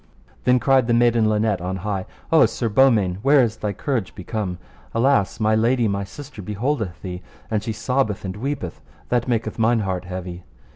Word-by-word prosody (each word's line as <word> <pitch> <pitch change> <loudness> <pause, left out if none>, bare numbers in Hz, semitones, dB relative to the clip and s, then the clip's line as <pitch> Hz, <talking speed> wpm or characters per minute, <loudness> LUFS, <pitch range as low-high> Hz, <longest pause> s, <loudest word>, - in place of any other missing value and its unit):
Then 125 0 +5
cried 130 -2 +3
the 120 - +3
maiden 115 -2 +4
Linet 105 -3 +1
on 90 +2 -3
high: 100 -3 -2 0.2
O 160 - +6
Sir 115 - -2
Beaumains, 105 -6 +3
where 135 +2 +5
is 115 -2 -1
thy 105 - -2
courage 115 -1 -3
become? 95 -2 -4 0.4
Alas, 115 -4 +2
my 110 0 +2
lady 115 +2 +2
my 100 -1 -1
sister 135 +3 -10
beholdeth 105 - -2
thee, 90 -2 -5 0.3
and 110 -2 +1
she 110 - -3
sobbeth 115 -2 -1
and 95 0 -4
weepeth, 125 - -4 0.3
that 120 0 +1
maketh 115 -1 -1
mine 115 0 +3
heart 95 -2 -2
heavy. 90 -1 -6
110 Hz, 180 wpm, -22 LUFS, 95-125 Hz, 0.4 s, O